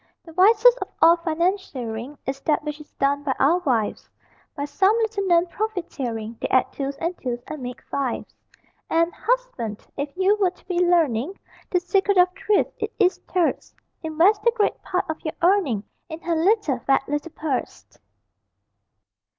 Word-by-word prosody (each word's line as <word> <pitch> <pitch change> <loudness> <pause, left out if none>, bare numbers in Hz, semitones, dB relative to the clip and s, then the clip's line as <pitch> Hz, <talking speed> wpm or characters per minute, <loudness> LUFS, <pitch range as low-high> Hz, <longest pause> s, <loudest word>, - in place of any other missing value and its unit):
The 330 - -12
wisest 460 +7 +5
of - - -2
all 335 +1 +7
financiering 310 - -2
Is 270 0 -3
that 300 0 +1
which 300 0 -5
is 300 - -15
done 280 +1 +1
by 280 -2 -1
our 325 +6 +3
wives: 245 -11 -1 0.5
By 285 -2 -3
some 380 +9 +2
little 440 -3 -1
known 345 -1 +4
profiteering 275 - -4
They - - 0
add 255 - +2
twos 275 0 -3
and 335 +4 -3
twos 245 -2 -3
and 305 - -7
make 250 0 -7
fives; 275 -3 -3 0.6
And, 335 +1 +2
husband, 470 - -2
if 285 0 -2
you 380 +2 +4
would 370 -2 +1
be 360 -2 -1
learning 335 - +2 0.3
The 360 - +2
secret 390 +2 +1
of 360 0 +6
thrift, 405 +1 +1
it 430 +1 -2
is 380 -3 +2
terse: 355 -3 0 0.3
Invest 340 +6 +3
the 470 - +4
great 420 -3 0
part 365 - -1
of 315 0 -5
your 310 - -4
earning 340 - +3 0.3
In 315 0 -6
her 335 0 -1
little, 335 - +2
fat 270 +2 +1
little 295 +3 -3
purse. 270 - -3
330 Hz, 165 wpm, -23 LUFS, 275-380 Hz, 0.6 s, all